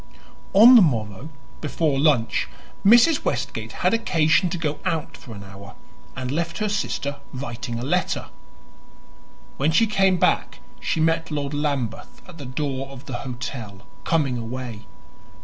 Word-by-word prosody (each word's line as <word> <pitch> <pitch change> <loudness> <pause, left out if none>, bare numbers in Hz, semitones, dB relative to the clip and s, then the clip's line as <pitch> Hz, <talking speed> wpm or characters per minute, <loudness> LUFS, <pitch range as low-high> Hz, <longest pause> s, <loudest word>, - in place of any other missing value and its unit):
On 225 +6 +9
the 235 - +9
morrow, 115 - 0 0.3
before 150 -2 0
lunch, 135 -7 +2 0.4
Mrs. 240 +9 +6
Westgate - - -3
had - - +4
occasion 175 -5 +2
to 175 - -3
go 155 -2 -2
out 165 -5 -2
for 115 -4 -11
an 100 - -9
hour, 100 +1 -12 0.4
and 130 -1 -4
left 165 +3 -2
her 210 -1 -1
sister 145 -8 -2
writing 120 -3 -5
a 120 - -4
letter. - - -1 1.3
When 145 +4 +2
she 225 +8 +4
came 195 -3 +2
back - - +1 0.2
she - - -1
met 165 +1 +1
Lord 145 -2 -3
Lambeth 140 -6 -3
at 175 -3 -13
the 140 - -7
door 135 0 -3
of 135 0 -11
the 130 -4 -4
hotel, 120 -5 -6 0.2
coming 140 -7 +1
away. 115 -1 -6
145 Hz, 150 wpm, -23 LUFS, 125-165 Hz, 1.3 s, On